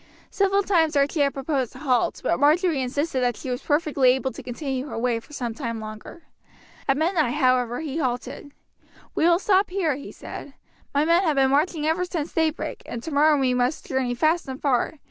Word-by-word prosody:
Several 395 Hz, 0 st, +2 dB
times 330 Hz, -6 st, +2 dB
Archie 280 Hz, +3 st, +2 dB
had 280 Hz, -1 st, +2 dB
proposed 270 Hz, -3 st, -2 dB
a -, -, -9 dB
halt, 260 Hz, -4 st, 0 dB
but -, -, +1 dB
Marjory 310 Hz, +1 st, +3 dB
insisted 270 Hz, +2 st, -1 dB
that 245 Hz, -2 st, 0 dB
she 260 Hz, -, -5 dB
was 245 Hz, +2 st, -3 dB
perfectly 290 Hz, -3 st, +2 dB
able 265 Hz, 0 st, -2 dB
to -, -, -9 dB
continue 265 Hz, +1 st, -4 dB
her -, -, -6 dB
way 235 Hz, 0 st, 0 dB
for 230 Hz, -, -19 dB
some 245 Hz, -5 st, -4 dB
time 230 Hz, -3 st, -4 dB
longer. 215 Hz, +9 st, -9 dB, 0.6 s
At 275 Hz, 0 st, +2 dB
midnight, 315 Hz, -5 st, +1 dB
however, 255 Hz, -2 st, +2 dB
he 310 Hz, 0 st, -4 dB
halted. 255 Hz, +1 st, -3 dB, 0.6 s
"We 320 Hz, -, +1 dB
will 340 Hz, 0 st, +5 dB
stop 390 Hz, +1 st, +2 dB
here," 360 Hz, -6 st, 0 dB
he 280 Hz, -, -9 dB
said. 280 Hz, -, -9 dB, 0.4 s
"My 285 Hz, +2 st, +2 dB
men 335 Hz, +2 st, +4 dB
have 320 Hz, -6 st, +1 dB
been 265 Hz, -1 st, +3 dB
marching 300 Hz, +2 st, +1 dB
ever 320 Hz, +3 st, +1 dB
since 340 Hz, -3 st, -4 dB
daybreak, 320 Hz, -1 st, -1 dB
and 235 Hz, 0 st, -6 dB
tomorrow 300 Hz, -1 st, +3 dB
we 260 Hz, -2 st, +2 dB
must 250 Hz, +4 st, 0 dB
journey 260 Hz, -2 st, -1 dB
fast 315 Hz, +6 st, +1 dB
and 265 Hz, 0 st, -6 dB
far. 270 Hz, 0 st, +1 dB
285 Hz, 200 wpm, -24 LUFS, 255-320 Hz, 0.6 s, will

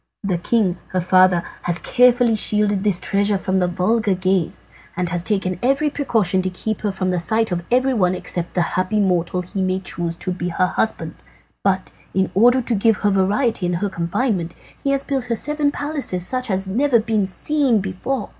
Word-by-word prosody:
"The 185 Hz, -4 st, -1 dB
king, 185 Hz, -2 st, 0 dB
her 185 Hz, -, +1 dB
father, 185 Hz, -1 st, +4 dB, 0.2 s
has 175 Hz, -1 st, 0 dB
carefully 245 Hz, +2 st, +3 dB
shielded 210 Hz, -2 st, +1 dB
this 200 Hz, -4 st, +2 dB
treasure 200 Hz, +1 st, +2 dB
from 190 Hz, 0 st, -1 dB
the 180 Hz, -, +1 dB
vulgar 200 Hz, +3 st, +1 dB
gaze, 185 Hz, -2 st, -1 dB, 0.3 s
and 180 Hz, -1 st, 0 dB
has 175 Hz, 0 st, +1 dB
taken 185 Hz, -2 st, -1 dB
every 275 Hz, +4 st, +1 dB
precaution 215 Hz, -10 st, +1 dB
to 185 Hz, -, -1 dB
keep 210 Hz, +3 st, -4 dB
her 210 Hz, -, -1 dB
from 185 Hz, -1 st, -2 dB
the 180 Hz, -, 0 dB
sight 220 Hz, +4 st, +1 dB
of 175 Hz, -1 st, -2 dB
everyone 245 Hz, -8 st, +2 dB
except 175 Hz, -1 st, -4 dB
the 175 Hz, -, +2 dB
happy 185 Hz, +3 st, 0 dB
mortal 180 Hz, -2 st, 0 dB
he 190 Hz, +2 st, -5 dB
may 185 Hz, 0 st, 0 dB
choose 170 Hz, -2 st, -3 dB
to 185 Hz, -, -3 dB
be 180 Hz, -1 st, -3 dB
her 185 Hz, +1 st, +1 dB
husband. 175 Hz, -5 st, -1 dB, 0.5 s
But 190 Hz, -1 st, 0 dB, 0.2 s
in 190 Hz, -1 st, +1 dB
order 245 Hz, +6 st, +4 dB
to 235 Hz, -, -1 dB
give 225 Hz, +1 st, +3 dB
her 205 Hz, -, +4 dB
variety 195 Hz, +1 st, +1 dB
in 175 Hz, -, -1 dB
her 195 Hz, +4 st, -1 dB
confinement 175 Hz, 0 st, -2 dB, 0.3 s
he 275 Hz, -, 0 dB
has 275 Hz, 0 st, +1 dB
built 270 Hz, -3 st, -2 dB
her 235 Hz, -1 st, -1 dB
seven 295 Hz, +4 st, 0 dB
palaces 285 Hz, -, -2 dB
such 255 Hz, +3 st, -2 dB
as 190 Hz, 0 st, -1 dB
have 190 Hz, -, -6 dB
never 265 Hz, -2 st, +3 dB
been 215 Hz, -3 st, 0 dB
seen 275 Hz, +4 st, +1 dB
before. 200 Hz, +5 st, -3 dB
195 Hz, 195 wpm, -20 LUFS, 180-230 Hz, 0.5 s, father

